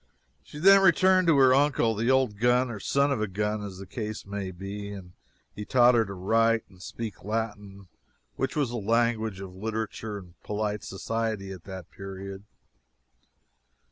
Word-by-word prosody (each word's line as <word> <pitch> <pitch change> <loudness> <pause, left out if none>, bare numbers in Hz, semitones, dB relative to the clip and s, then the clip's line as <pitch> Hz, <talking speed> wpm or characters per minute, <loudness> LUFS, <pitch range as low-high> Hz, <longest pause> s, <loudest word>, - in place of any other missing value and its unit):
She - - -12
then 195 +5 +7
returned 185 0 +4
to 160 -4 +5
her 130 -1 +6
uncle, 135 -4 +3
the 115 +3 -1
old 130 -6 +2
gun, 120 +1 +3
or 105 - -6
son 140 +7 +1
of 125 -6 0
a 110 - 0
gun, 105 +2 -2
as 100 -2 -7
the 95 - -8
case 110 +2 -5
may 100 -1 -4
be, 100 +3 -7
and 95 -3 -9 0.4
he 105 - -6
taught 125 +2 +5
her 115 -2 +3
to 100 0 -7
write 115 +4 +2
and 95 -2 -19
speak 110 0 -7
Latin, 105 -2 -4 0.5
which 135 - -2
was 145 -6 0
the 120 - -3
language 110 -2 0
of 95 -2 -8
literature 110 +1 -4
and 90 -4 -14
polite 105 0 -3
society 110 0 -3
at 90 -3 -10
that 95 -3 -9
period. 95 +1 -8
110 Hz, 175 wpm, -27 LUFS, 100-120 Hz, 0.5 s, then